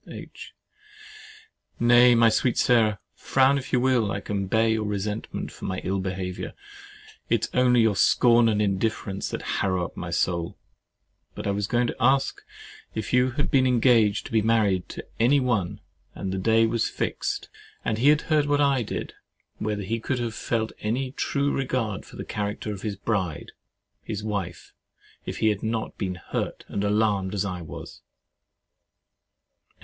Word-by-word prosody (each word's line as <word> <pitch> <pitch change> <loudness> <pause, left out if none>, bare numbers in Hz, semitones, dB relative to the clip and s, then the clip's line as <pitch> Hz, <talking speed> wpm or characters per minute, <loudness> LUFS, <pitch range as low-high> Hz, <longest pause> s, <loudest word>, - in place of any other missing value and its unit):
H. - - -10 1.2
Nay, 120 +1 +6
my 115 0 +6
sweet 120 +2 +1
Sarah 110 -4 +3 0.2
(frown 135 +1 +2
if 130 - -9
you 125 - +3
will, 120 -5 +2
I 100 - -2
can 100 -1 -3
bear 110 +3 +2
your 110 -1 +1
resentment 105 +1 -3
for - - -9
my 95 - -2
ill 95 +1 -1
behaviour, 95 -1 -4 0.8
it - - +2
is - - -12
only 125 -1 +4
your 110 -3 +3
scorn 120 +3 +4
and 105 -1 +1
indifference 100 0 -1
that - - -5 0.2
harrow 95 -2 0
up - - -10
my - - -5
soul)—but 85 -2 -5
I 100 - +1
was 100 0 -1
going 120 +2 +1
to - - -3
ask, 135 +3 +2 0.5
if 110 +1 -4
you 125 +1 +4
had 145 - 0
been 130 -1 +4
engaged 115 -4 +3
to - - -9
be 110 -1 +3
married 105 -4 +1
to - - -7
any 130 +5 +4
one, 115 -9 -1 0.3
and 95 - -4
the 95 - -2
day 115 +3 +4
was 115 0 0
fixed, - - -3 0.4
and 110 - 0
he 130 - +3
had 150 +1 +4
heard 150 -2 +1
what 145 0 +2
I 140 -3 +3
did, 110 - -5 0.5
whether 105 -1 -2
he 115 +4 -2
could 130 +3 -2
have 120 -2 -3
felt 110 0 -2
any 125 +5 -2
true 140 +1 -1
regard 125 -7 -2
for - - -13
the - - -6
character 105 0 -3
of 100 - -8
his 105 -3 -3
bride, 95 -6 -2 0.5
his 105 -2 -5
wife, 100 -5 -4 0.5
if - - -4
he 110 - +3
had 105 -2 -1
not 110 0 -3
been 95 -3 -2
hurt 90 - -4
and 100 - -2
alarmed 105 -2 +1
as 100 - 0
I 90 -2 -4
was? 80 - -9
110 Hz, 170 wpm, -25 LUFS, 100-120 Hz, 1.2 s, Nay